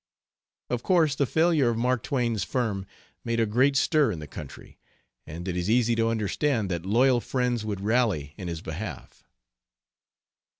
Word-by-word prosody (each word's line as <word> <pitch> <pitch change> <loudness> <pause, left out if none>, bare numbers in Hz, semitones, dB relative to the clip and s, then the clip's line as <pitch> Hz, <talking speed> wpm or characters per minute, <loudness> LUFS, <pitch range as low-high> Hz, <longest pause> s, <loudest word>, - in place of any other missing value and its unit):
Of 125 -1 -1
course 165 -6 +3
the 140 -1 0
failure 160 -5 +3
of 115 - -1
Mark 125 0 +1
Twain's 120 -6 -1
firm 105 -7 -2 0.4
made 115 0 -1
a 115 - +3
great 130 +6 +2
stir 145 -2 +3
in 90 - -4
the 75 - -7
country, 70 - -11 0.5
and 85 +4 -7
it 90 - -2
is 90 +2 -2
easy 120 0 +3
to 115 0 +1
understand 110 0 0
that 85 +1 -3
loyal 120 +4 +3
friends 125 -3 -1
would 105 -3 -4
rally 105 - 0
in 95 - -7
his 85 -2 -5
behalf. 80 - -7
115 Hz, 165 wpm, -26 LUFS, 95-125 Hz, 0.5 s, course